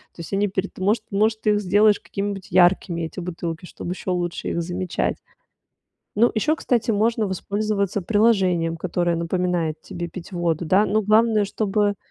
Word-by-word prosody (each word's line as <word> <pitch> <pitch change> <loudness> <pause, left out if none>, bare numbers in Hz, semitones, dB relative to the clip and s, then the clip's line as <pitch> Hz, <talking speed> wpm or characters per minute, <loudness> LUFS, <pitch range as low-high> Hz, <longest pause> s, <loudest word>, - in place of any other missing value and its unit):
То - - -18
есть 170 +3 -7
они 200 +1 +2
перед 195 0 -3
может 205 +5 +1
может, 215 +2 +1
ты 210 - +2
их 210 0 +1
сделаешь 205 +2 +4
какими-нибудь 200 -1 -5
яркими, 175 -1 +3
эти 165 +3 -5
бутылки, 170 -1 -5
чтобы 175 - -7
еще 185 - -7
лучше 175 -1 -2
их 170 - -1
замечать. 180 +1 -2 1.0
Ну 235 +2 +5
еще, 300 +8 +1
кстати, 235 -6 0
можно 220 +1 +1
воспользоваться 200 +1 -1
приложением, 185 -5 +2
которое 175 0 -1
напоминает 170 -2 -1
тебе 175 -1 -6
пить 175 +3 -10
воду, 175 -2 -1
да. 190 +6 +4
Но 215 +2 +1
главное, 215 +1 +3
чтобы 205 0 0
190 Hz, 165 wpm, -23 LUFS, 175-210 Hz, 1.0 s, Ну